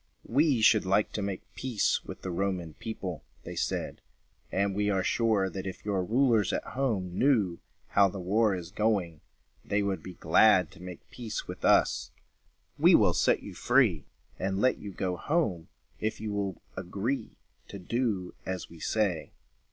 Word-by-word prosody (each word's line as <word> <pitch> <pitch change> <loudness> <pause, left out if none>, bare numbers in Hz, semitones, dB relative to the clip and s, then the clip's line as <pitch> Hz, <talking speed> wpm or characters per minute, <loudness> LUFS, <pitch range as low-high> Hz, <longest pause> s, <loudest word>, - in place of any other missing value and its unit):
"We 140 -1 +2
should 110 -1 +5
like 100 +3 +2
to 105 - -3
make 100 -2 -3
peace 125 -6 0
with - - -9
the 95 - -3
Roman 90 -3 -2
people," 95 -3 -6 0.2
they - - -7
said, - - -2 0.5
"and 100 0 +1
we 105 0 +1
are 95 -2 +1
sure, 110 -3 +2
that, 95 +2 -5
if 95 - -7
your 100 -3 0
rulers 115 0 +2
at - - -1
home 105 -9 -2
knew 110 -11 +2 0.3
how 100 0 +5
the 95 - -7
war 100 +3 +2
is 90 -1 -7
going, 100 -7 0 0.4
they 100 0 0
would 95 -4 -1
be 90 +1 -9
glad 100 -1 +4
to - - -15
make 90 -2 -9
peace 115 -3 -5
with - - -8
us. - - +3 0.7
We - - +7
will - - +4
set - - +2
you - - -8
free 115 - +2 0.3
and 95 0 -1
let 130 +4 +2
you 100 - -7
go 90 -1 -2
home, 110 - -1 0.3
if 110 0 -2
you 105 -1 -4
will 100 -3 -3
agree 100 +8 -3 0.3
to 100 - -8
do 100 -2 -2
as 95 -2 -5
we 85 - -12
say." 100 -4 -1
100 Hz, 170 wpm, -29 LUFS, 90-110 Hz, 0.7 s, We